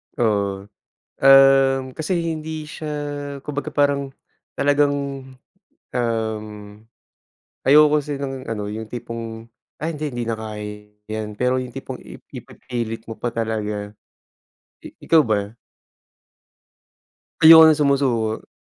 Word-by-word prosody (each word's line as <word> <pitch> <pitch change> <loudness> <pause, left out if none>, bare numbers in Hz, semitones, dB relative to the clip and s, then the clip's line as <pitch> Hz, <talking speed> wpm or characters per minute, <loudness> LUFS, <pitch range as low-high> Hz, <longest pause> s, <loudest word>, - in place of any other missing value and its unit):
Oo, 100 -4 0 0.6
um, 135 0 +6
kasi 155 +4 -3
hindi 160 -2 -4
siya, 155 0 -7 0.5
kumbaga, 145 +1 -5
parang 140 -1 +1 0.4
talagang, 145 0 +2 1.0
um, 110 -3 -1 1.2
ayoko 150 +2 +6
kasi 145 -1 -4
ng 135 -2 -5
ano, 105 -2 -4
yung 110 +1 -5
tipong, 115 0 -7 0.3
ay 155 - -2
hindi, 155 - -4
hindi 120 0 -3
na 115 - -2
kaya 105 -1 -7 0.2
’yan. 110 -1 -4
Pero 125 +1 +2
yung 125 -1 -4
tipong - - -7
ip - - -12
ipipilit 115 -2 -6
mo 115 - -5
pa 120 - -2
talaga. 105 -2 -3 0.9
I - - -7 0.2
ikaw 165 -1 +7
ba? 105 0 -1 1.8
Ayoko 160 0 +10
ng 155 - +3
sumusuko. 130 -7 0
125 Hz, 115 wpm, -21 LUFS, 110-145 Hz, 1.8 s, Ayoko